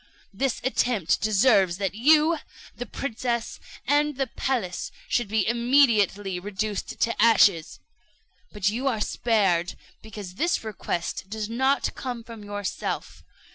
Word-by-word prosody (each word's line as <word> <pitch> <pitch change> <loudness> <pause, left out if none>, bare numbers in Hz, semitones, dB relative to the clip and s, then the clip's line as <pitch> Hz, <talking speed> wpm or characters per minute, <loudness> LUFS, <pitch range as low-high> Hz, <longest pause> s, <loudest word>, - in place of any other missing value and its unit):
This 265 +5 -1
attempt 240 -8 +1
deserves 200 -4 +3
that 195 -2 -2
you, 305 +7 +4 0.4
the 245 - -6
princess, 235 -1 -3 0.3
and 290 +2 +2
the 270 - +1
palace, 230 -7 -3 0.2
should 240 -3 0
be 215 0 0
immediately 230 -6 +2
reduced 205 +2 -4
to 230 - +1
ashes; 205 - +4 0.7
but 205 -2 -2
you 245 +6 -2
are 235 -5 0
spared 195 -6 +1 0.3
because 205 -4 -9
this 345 -6 0
request 190 -3 -4
does 215 0 -4
not 265 +4 +1
come 245 -3 -5
from 225 -2 -10
yourself. 205 -1 -5
220 Hz, 125 wpm, -25 LUFS, 200-250 Hz, 0.7 s, you